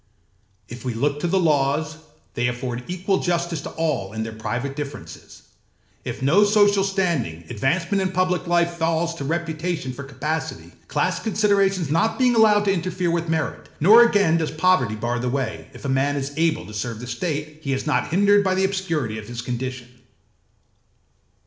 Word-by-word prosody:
If 120 +1 -9
we 125 -3 -3
look 145 +5 0
to 175 - -1
the 190 +3 +2
laws, 150 -1 +1 0.4
they 120 0 0
afford 125 0 -4
equal 185 +2 0
justice 170 -2 -1
to - - -6
all 140 -12 -2
in 110 0 -3
their 110 0 -6
private 120 +5 -4
differences; 140 - -8 0.6
if - - -5
no 170 +10 +5
social 205 -1 +4
standing, 170 - -1
advancement 170 - 0
in 185 -1 -1
public 185 -1 0
life 170 0 +2
falls 165 0 0
to 165 - -6
reputation 160 -2 -2
for 140 - -8
capacity, 145 +4 -4 0.2
class - - 0
considerations 195 -6 +1
not 165 +8 +1
being 255 -2 +3
allowed 215 -2 +5
to 195 - +3
interfere 180 -1 -1
with 170 -1 -1
merit; 160 -2 -2
nor 210 +9 +8
again 205 -8 +4
does 160 -2 -1
poverty 155 - +2
bar 120 +3 -2
the 125 +1 -1
way, 130 -4 -3
if 130 +1 -12
a - - -1
man 135 +2 +1
is 140 0 -3
able 160 0 +1
to 105 - -11
serve 110 +1 -4
the 125 - -7
state, 150 +4 -4
he 140 - -3
is 135 - -2
not 150 - +1
hindered 200 +3 +4
by 190 -1 +1
the 190 +1 +2
obscurity 165 - -2
of 105 - -10
his 120 0 -6
condition. 125 0 -4
160 Hz, 180 wpm, -23 LUFS, 130-185 Hz, 0.6 s, nor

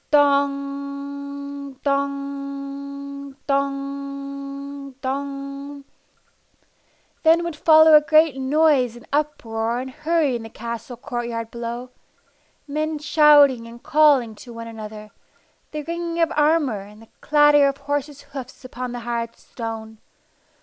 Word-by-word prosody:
Dong! 280 0 0
Dong! 280 0 -4
Dong! 275 0 -4
Dong! 275 +1 -5 1.4
Then 330 +1 +5
would 340 -2 -3
follow 315 0 +7
a 300 - +9
great 310 -1 +4
noise 270 -2 +3
and 240 - -14
uproar 235 -6 -1
and 260 +1 -5
hurry 310 -2 +1
in 235 - -3
the 225 - -8
castle 235 +2 -6
court 240 -2 -4
yard 230 -1 -4
below; 240 +1 -5 0.8
men 305 +2 -1
shouting 290 -5 +5
and 235 +1 -12
calling 290 -7 +4
to 235 +3 -12
one 230 0 -7
another, 215 -1 -8 0.6
the 300 0 -5
ringing 335 +1 -3
of 330 - +3
armor, 295 -7 +3
and 205 +2 -13
the 225 - -19
clatter 295 -1 +5
of 275 0 -1
horses' 285 0 -3
hoofs 270 -2 -9
upon 250 -1 -5
the 245 - -5
hard 235 0 -3
stone. 220 -2 -7
280 Hz, 120 wpm, -23 LUFS, 245-290 Hz, 1.4 s, a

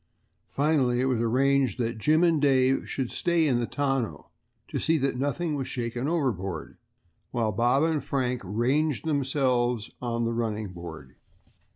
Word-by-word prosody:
Finally 140 -4 +2
it 130 - +2
was 125 -3 +1
arranged 130 +1 +2
that 115 -2 -2
Jim 155 +8 +3
and 165 -4 +3
Dave 135 -2 +3
should 130 -3 -3
stay 170 -2 +1
in 125 -4 +2
the 120 - -1
tonneau 135 -5 -2 0.4
to - - -3
see 160 0 +2
that 135 -2 0
nothing 145 +5 -1
was 135 -3 -3
shaken 120 +1 -3
overboard, 110 - -2 0.5
while 115 -3 0
Bob 120 +6 +2
and 160 -4 +1
Frank 125 -3 -1
ranged 130 - 0
themselves 130 -6 0
on 120 -1 -1
the 115 - -1
running 110 -3 -2
board. 80 -6 -10
130 Hz, 155 wpm, -27 LUFS, 115-145 Hz, 0.5 s, Jim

